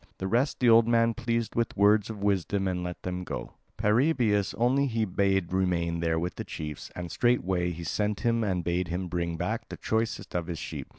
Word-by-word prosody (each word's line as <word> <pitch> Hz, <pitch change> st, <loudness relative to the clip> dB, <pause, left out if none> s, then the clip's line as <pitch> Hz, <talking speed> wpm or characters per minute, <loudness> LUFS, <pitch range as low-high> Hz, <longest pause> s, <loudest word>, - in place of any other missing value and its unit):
The 95 Hz, -, -4 dB
rest 120 Hz, +8 st, +1 dB
the 125 Hz, -, +3 dB
old 115 Hz, 0 st, +7 dB
man 115 Hz, 0 st, +3 dB
pleased 115 Hz, 0 st, -2 dB
with 115 Hz, -2 st, -1 dB
words 105 Hz, +1 st, +4 dB
of 105 Hz, -3 st, -6 dB
wisdom 100 Hz, 0 st, +1 dB
and 90 Hz, -1 st, -2 dB
let 90 Hz, 0 st, -6 dB
them 90 Hz, 0 st, -3 dB
go; -, -, -5 dB, 0.3 s
Paraebius 110 Hz, -2 st, +2 dB
only 130 Hz, +4 st, +3 dB
he 115 Hz, -3 st, 0 dB
bade 95 Hz, -2 st, 0 dB
remain 85 Hz, -3 st, 0 dB
there 80 Hz, -1 st, 0 dB
with 85 Hz, +2 st, -3 dB
the -, -, -3 dB
chiefs; 75 Hz, -2 st, -6 dB
and 90 Hz, -2 st, -5 dB
straightway 95 Hz, -8 st, +1 dB
he 85 Hz, 0 st, -6 dB
sent 105 Hz, +5 st, -1 dB
him 115 Hz, -2 st, +1 dB
and 95 Hz, -4 st, -1 dB
bade 85 Hz, +1 st, 0 dB
him 90 Hz, +2 st, -3 dB
bring 85 Hz, -1 st, -2 dB
back -, -, -3 dB
the -, -, -7 dB
choicest 110 Hz, +1 st, -2 dB
of 85 Hz, -1 st, -2 dB
his 85 Hz, -2 st, -4 dB
sheep. -, -, -6 dB
95 Hz, 210 wpm, -28 LUFS, 90-115 Hz, 0.3 s, old